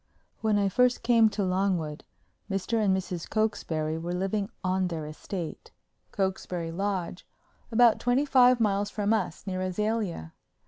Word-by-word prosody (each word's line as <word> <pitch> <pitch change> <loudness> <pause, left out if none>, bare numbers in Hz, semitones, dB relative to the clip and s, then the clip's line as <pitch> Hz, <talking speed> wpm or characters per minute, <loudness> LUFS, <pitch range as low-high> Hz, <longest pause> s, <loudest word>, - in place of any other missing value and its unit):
When 215 -2 +2
I 200 -1 +2
first 250 +5 +2
came 230 -2 +5
to 205 -1 -2
Longwood, 185 -5 -1 0.5
Mr. 210 +3 0
and 190 -2 +3
Mrs. 180 -3 -5
Cokesbury 160 -8 -1
were 175 +2 -3
living 195 +2 -1
on 185 0 +1
their 165 -3 -4
estate, 160 +2 -6 0.4
Cokesbury 185 -4 -2
Lodge, 185 -1 -3 0.4
about 235 0 +5
twenty 245 +4 +2
five 255 -3 +5
miles 205 -2 +1
from 210 0 0
us, 195 -6 -2
near 185 -2 -3
Azalea. 185 - -2
195 Hz, 140 wpm, -28 LUFS, 180-220 Hz, 0.5 s, came